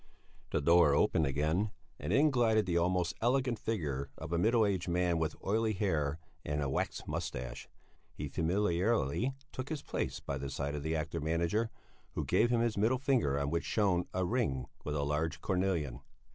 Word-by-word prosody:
The - - 0
door 85 -1 +5
opened 75 0 +3
again, 80 +9 +1 0.3
and - - -3
in 150 +2 +5
glided 115 -4 +3
the 90 -2 -1
almost 90 0 +2
elegant 125 -1 +1
figure 75 -13 -2
of 80 +2 -6
a 85 - +2
middle 115 +3 +4
aged 95 -4 -1
man 90 -1 +1
with 80 -1 -1
oily 110 +2 +1
hair 80 -7 0 0.3
and 75 0 -2
a 70 - 0
waxed 65 - -2
moustache. 60 0 -4 0.4
He - - -5
familiarly 95 - +1 0.2
took 130 +1 -5
his 155 -3 -4
place - - -3
by 70 0 -4
the 70 0 -4
side 70 +1 -3
of 75 - -3
the 80 +2 -1
actor 80 +1 -2
manager, 85 +8 0 0.4
who - - -2
gave 120 - +3
him 120 -1 +2
his 115 -3 0
middle 115 +5 +3
finger 125 - +1
on 70 0 -1
which 85 0 0
shone 95 -5 +1
a 95 0 0
ring 90 - 0 0.2
with 75 - -3
a 70 - 0
large 75 +3 -1
cornelian. 90 -9 -1
85 Hz, 185 wpm, -33 LUFS, 75-110 Hz, 0.4 s, door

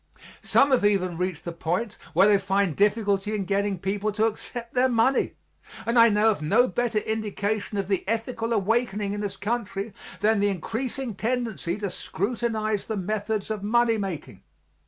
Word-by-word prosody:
Some 280 0 +3
have 255 -5 +3
even 190 -4 +2
reached 180 -2 -3
the 170 - -3
point 180 +6 -2
where 185 +5 +6
they 205 -1 +5
find 195 -3 +1
difficulty 205 0 +1
in 200 -2 -2
getting 200 0 0
people 200 +4 -1
to 215 +1 +2
accept 235 +2 -4
their 255 +1 +3
money; 240 +3 +2 0.5
and 235 +1 +3
I 230 0 +8
know 215 +1 +4
of 200 - -4
no 220 +12 +4
better 240 -3 -1
indication 215 -1 -2
of 195 -2 -1
the 195 -2 0
ethical 230 +1 -2
awakening 210 -1 0
in 205 - -3
this 205 -1 -4
country 210 -2 -3 0.3
than 215 0 +3
the 205 - +3
increasing 230 +6 -3
tendency 225 -4 -2
to 200 -3 -3
scrutinize 215 +1 -2
the 220 - -3
methods 210 +2 -2
of 215 -2 -3
money 230 +2 +2
making. 190 -6 -5
210 Hz, 170 wpm, -26 LUFS, 195-230 Hz, 0.5 s, I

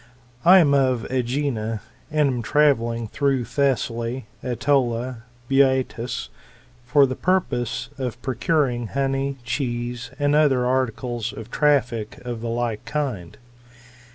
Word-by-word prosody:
I 180 +3 +8
am 155 -6 +5
of 130 -4 +2
^ginn, 125 -3 -1 0.3
and 150 -2 +2
am 125 -3 -1
travelling 115 -3 +2
through 135 0 0
Thessaly, 125 -3 -1 0.2
^tolia, 125 -1 +1
and 115 - -13 0.3
Boeotia, 130 -3 +1 0.5
for 140 +3 +5
the 130 -1 -3
purpose 125 - -1
of 125 -3 -3
procuring 130 -2 0
honey,* 135 +1 -1
cheese, 120 -1 -3
and 145 0 +1
other 140 -5 +3
articles 120 -2 -1
of 110 +1 -9
traffic 125 -7 +1
of 120 -2 -4
the 115 - -3
like 115 -2 -2
kind. 130 - -3
125 Hz, 120 wpm, -23 LUFS, 120-140 Hz, 0.5 s, I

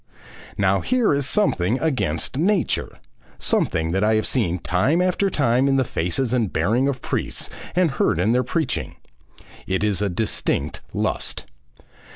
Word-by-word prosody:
Now - - +2
here 250 -9 +2
is 140 -1 0
something 115 - +1
against 150 -4 -1
nature, 180 +5 0 0.4
something 80 0 0
that 95 +3 0
I 110 +1 +3
have 110 - +1
seen 95 -9 +1
time 95 - +1
after 185 +2 +1
time 130 -5 +2
in 135 - +3
the 135 - +3
faces 115 +5 -1
and 115 -6 +1
bearing 110 - +1
of 135 -2 -3
priests - - -3 0.2
and 180 -4 +3
heard 135 - +1
in 95 +6 +2
their 125 +1 +2
preaching. 160 +6 -2 0.7
It 95 +2 0
is 105 -2 +1
a 100 - +1
distinct 85 -6 -1
lust. - - -2
125 Hz, 155 wpm, -22 LUFS, 95-145 Hz, 0.7 s, I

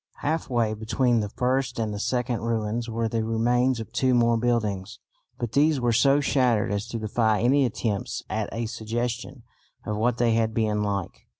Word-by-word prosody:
Half 155 +3 -1
way 115 -3 +1
between 115 +3 +1
the 105 -1 -2
first 130 +2 -1
and 110 -2 -1
the 100 - -5
second 125 +1 -1
ruins 115 0 -2
were 115 0 -1
the 110 0 -1
remains 120 +3 +1
of 110 - -7
two 130 -1 +2
more 120 -1 +3
buildings, 110 -5 -1 0.4
but 120 -2 -4
these 145 +3 +3
were 120 -1 +1
so 135 +5 +4
shattered 125 -7 +2
as 100 +2 -2
to 115 - -4
defy 110 0 +1
any 135 +4 +4
attempts 105 -2 -3
at - - -2
a 115 +1 -3
suggestion 120 +3 -4 0.4
of 105 - -2
what 115 +2 +1
they 120 -1 +2
had 110 -1 +1
been 105 -2 +1
like. 100 -3 -3
115 Hz, 185 wpm, -25 LUFS, 110-125 Hz, 0.4 s, so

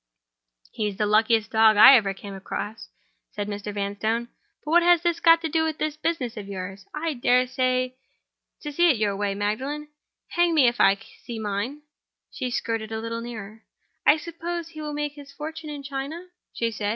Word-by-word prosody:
"He's 210 -2 -3
the 210 - +1
luckiest 220 0 +3
dog 220 -1 +5
I 220 - +11
ever 205 -5 +3
came 200 +1 -9
across," 205 +3 -6 0.4
said 205 -1 -3
Mr. 205 0 -5
Vanstone 210 +4 -2 0.4
"But 300 - -3
what 345 +1 +6
has 345 -1 +4
that 345 -1 0
got 330 0 +6
to 325 - -1
do 320 +1 +1
with 315 -1 -2
this 310 -1 -2
business 300 -8 -2
of 205 -2 -6
yours? 195 0 -7
I 315 +1 -2
dare 250 0 +3
say 255 0 0 0.7
you 295 - -4
see 345 +3 +4
your 210 -4 0
way, 200 0 -1
Magdalen. 265 +9 -3 0.4
Hang 345 -1 +2
me 275 -5 +6
if 240 0 +1
I 195 - +6
can 200 - -17 0.2
see 235 - -6
mine!" 220 +7 -3 0.5
She 255 -2 -3
skirted 225 -2 -2
a 220 - -3
little 230 +1 -4
nearer. 220 -2 -8 0.4
"I 300 - +6
suppose 335 +1 -5
he 310 -2 -9
will 300 -1 -4
make 295 0 -2
his 285 -1 -12
fortune 310 +2 -7
in 290 -1 -6
China?" 280 +6 -5 0.2
she 230 -1 -1
said. 205 -1 -3
245 Hz, 190 wpm, -25 LUFS, 210-300 Hz, 0.7 s, I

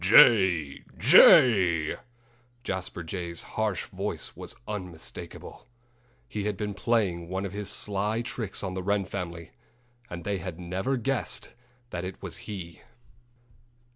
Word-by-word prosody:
"Jay! 95 -7 +6 0.2
jay!" 90 -10 +7 0.7
Jasper 95 -5 -4
Jay's 85 0 -4
harsh 105 -5 -2
voice - - -5
was - - -8
unmistakable. 90 -2 -7 0.6
He 105 -1 -4
had 105 -2 -1
been 105 0 -3
playing 100 -6 0
one 95 +2 -2
of 95 - -4
his 100 0 -4
sly 105 +2 -1
tricks 110 -4 -4
on 95 -2 -3
the 95 - -3
Wren 100 +1 +1
family; 85 -3 -6 0.6
and 85 -1 -6
they 100 0 -1
had 90 0 -6
never 95 +9 -1
guessed 135 +1 -1 0.4
that 85 0 -4
it 95 +1 -6
was - - -4
he! 90 -5 -7
95 Hz, 130 wpm, -28 LUFS, 85-105 Hz, 0.7 s, jay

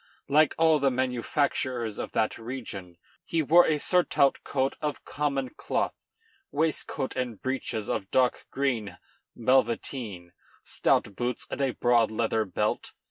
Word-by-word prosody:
Like 150 +2 +4
all 160 -1 +5
the 140 -1 +3
manufacturers 125 -2 -1
of - - -4
that 110 - 0
region, 110 -7 -7 0.3
he 165 -1 0
wore 170 +5 +6
a 155 - +2
surtout 150 -4 +2
coat 135 -1 0
of 150 -1 -3
common 140 -3 -1
cloth, - - -1 0.6
waistcoat 150 -3 -1
and 125 -4 -3
breeches 125 -5 -3
of 95 - -2
dark 130 -1 +1
green 115 -9 -1 0.4
velveteen, 115 -6 0 0.3
stout 100 - +1
boots, 120 +2 -2
and - - -3
a 135 -2 0
broad 120 -2 +3
leather 110 0 0
belt. 95 - -2
130 Hz, 135 wpm, -28 LUFS, 110-140 Hz, 0.6 s, wore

